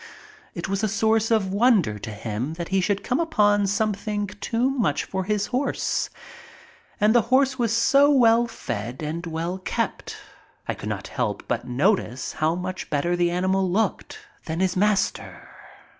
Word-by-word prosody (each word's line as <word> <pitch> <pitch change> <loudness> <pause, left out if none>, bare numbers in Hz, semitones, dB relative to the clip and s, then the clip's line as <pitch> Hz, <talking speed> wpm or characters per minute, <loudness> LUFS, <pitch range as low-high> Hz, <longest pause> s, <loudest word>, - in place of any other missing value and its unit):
It 170 - -4
was 195 +1 -2
a - - +3
source 220 +2 +1
of 205 -4 +1
wonder 200 - +3
to 110 - -7
him 110 +7 -4
that 170 0 -5
he 195 0 +2
should 200 +1 0
come 250 - 0
upon 205 -11 +2
something 205 0 -1
too 230 +5 -1
much 220 - 0
for 190 -1 -4
his 210 0 0
horse. 265 +3 -1 0.9
And 210 +1 +4
the 240 - +5
horse 265 0 +3
was 230 -3 +1
so 275 +5 +4
well 240 -4 +5
fed 120 - -5
and 160 +3 -4
well 165 +3 -3
kept. 185 - -3 0.5
I - - 0
could - - -7
not - - -4
help - - -2
but - - -2
notice 130 - 0
how 155 +2 0
much 185 +1 -5
better 155 +4 0
the 175 0 +2
animal 185 +2 +1
looked 220 - -1 0.3
than 160 +1 -3
his 185 -1 +1
master. 205 +1 0
195 Hz, 165 wpm, -24 LUFS, 170-225 Hz, 0.9 s, the